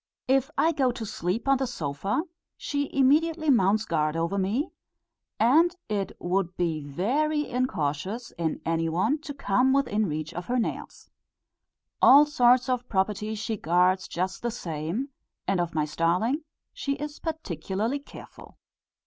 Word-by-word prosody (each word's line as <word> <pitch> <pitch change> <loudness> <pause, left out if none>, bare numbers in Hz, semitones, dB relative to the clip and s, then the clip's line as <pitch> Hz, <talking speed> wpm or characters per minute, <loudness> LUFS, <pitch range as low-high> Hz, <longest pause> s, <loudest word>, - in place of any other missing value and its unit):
If 270 +1 +2
I 325 - +4
go 275 -5 +2
to 235 -2 -6
sleep 195 +4 -3
on 275 -1 +4
the 265 - 0
sofa, 195 - -2 0.3
she 285 -1 -2
immediately 310 +3 +3
mounts 215 -2 +3
guard 155 -1 0
over 165 +4 -1
me, 200 +9 0 0.7
and 320 +10 +4
it 200 -3 -2
would 180 0 -1
be 165 -4 -1
very 285 - 0
incautious 215 - -2
in 165 -2 -3
any 165 0 0
one 205 - +1
to 295 - -7
come 260 +1 +2
within 220 -7 +1
reach 155 +1 -4
of 175 +1 -6
her 250 - 0
nails. 235 - -4 0.9
All 285 +3 +8
sorts 250 -3 +4
of 250 -1 -1
property 210 +2 0
she 220 +1 -3
guards 180 +2 +2
just 185 +2 -3
the 240 - -1
same, 175 - -4 0.4
and 190 -2 +2
of 170 -2 -4
my 155 -1 +2
starling 180 - 0 0.3
she 285 - -2
is 295 +1 -6
particularly 225 - -3
careful. 280 - -13
215 Hz, 150 wpm, -27 LUFS, 175-275 Hz, 0.9 s, All